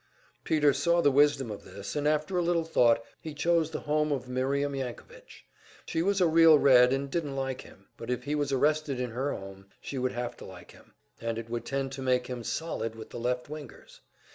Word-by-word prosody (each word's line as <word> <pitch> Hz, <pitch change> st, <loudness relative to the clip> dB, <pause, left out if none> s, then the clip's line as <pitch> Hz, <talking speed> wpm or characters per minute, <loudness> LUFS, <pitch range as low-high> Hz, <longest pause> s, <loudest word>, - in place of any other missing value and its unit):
Peter 150 Hz, -3 st, +3 dB
saw 170 Hz, +6 st, +2 dB
the 145 Hz, -4 st, +4 dB
wisdom 135 Hz, -3 st, +3 dB
of 105 Hz, -, -8 dB
this, 100 Hz, 0 st, -8 dB
and 145 Hz, 0 st, 0 dB
after 155 Hz, +5 st, 0 dB
a 180 Hz, -, +2 dB
little 170 Hz, -1 st, +1 dB
thought 120 Hz, -8 st, +3 dB, 0.2 s
he 155 Hz, -2 st, -7 dB
chose 165 Hz, +1 st, +2 dB
the 160 Hz, -, -5 dB
home 150 Hz, 0 st, 0 dB
of 130 Hz, -3 st, -2 dB
Miriam 140 Hz, +3 st, -1 dB
Yankovitch. 140 Hz, -, -8 dB, 0.4 s
She 165 Hz, -, -1 dB
was 195 Hz, +3 st, +1 dB
a 180 Hz, -, +4 dB
real 165 Hz, -1 st, +7 dB
Red, 125 Hz, -3 st, +6 dB
and 135 Hz, +1 st, -1 dB
didn't 145 Hz, -1 st, -3 dB
like 135 Hz, -1 st, -3 dB
him; 95 Hz, -, -17 dB
but 115 Hz, -, -8 dB
if 125 Hz, 0 st, -2 dB
he 145 Hz, +3 st, -3 dB
was 145 Hz, -2 st, -1 dB
arrested 145 Hz, 0 st, +1 dB
in 125 Hz, -2 st, -3 dB
her 130 Hz, +5 st, -2 dB
home, 95 Hz, 0 st, -8 dB
she 135 Hz, -, -5 dB
would 130 Hz, 0 st, -1 dB
have 120 Hz, 0 st, -4 dB
to -, -, -10 dB
like 90 Hz, -2 st, -12 dB
him, -, -, -20 dB, 0.3 s
and 115 Hz, -1 st, -2 dB
it 115 Hz, 0 st, -7 dB
would 120 Hz, -1 st, -3 dB
tend 135 Hz, -1 st, -2 dB
to 135 Hz, 0 st, -6 dB
make 125 Hz, -1 st, +1 dB
him 125 Hz, -1 st, -6 dB
"solid" 115 Hz, -7 st, -3 dB
with 110 Hz, -1 st, -10 dB
the -, -, -6 dB
"left 125 Hz, +1 st, -2 dB
wingers." 150 Hz, 0 st, -10 dB
135 Hz, 220 wpm, -29 LUFS, 125-155 Hz, 0.4 s, real